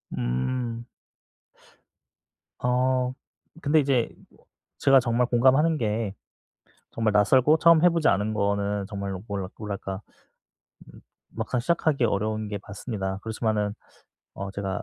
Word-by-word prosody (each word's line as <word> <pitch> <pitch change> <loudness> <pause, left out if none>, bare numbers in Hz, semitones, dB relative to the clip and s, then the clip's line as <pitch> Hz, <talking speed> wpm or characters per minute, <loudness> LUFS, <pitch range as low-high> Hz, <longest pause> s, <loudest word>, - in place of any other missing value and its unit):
음. 115 - -2 1.7
어 125 0 +1 0.5
근데 155 +1 +3
이제 135 -4 +1 0.2
뭐 - - -26 0.3
제가 135 -1 +6
정말 120 0 +1
공감하는 135 +7 +3
게 110 -4 -1 0.8
정말 110 -1 0
낯설고 130 +9 +4
처음 170 0 +5
해 180 - +7
보지 165 -2 +1
않은 105 +2 +2
거는 100 -1 0
정말로 100 -2 -5
뭐라 100 -3 -3
뭐랄까. 100 -2 -5 0.9
음 - - -15 0.4
막상 125 - -2
시작하기 155 -2 +1
어려운 110 0 -1
게 105 - -4
맞습니다. 100 -2 -4
그렇지마는 110 -2 -1 0.6
어 100 0 -5
제가 95 -1 -4
110 Hz, 245 characters per minute, -26 LUFS, 100-130 Hz, 1.7 s, 해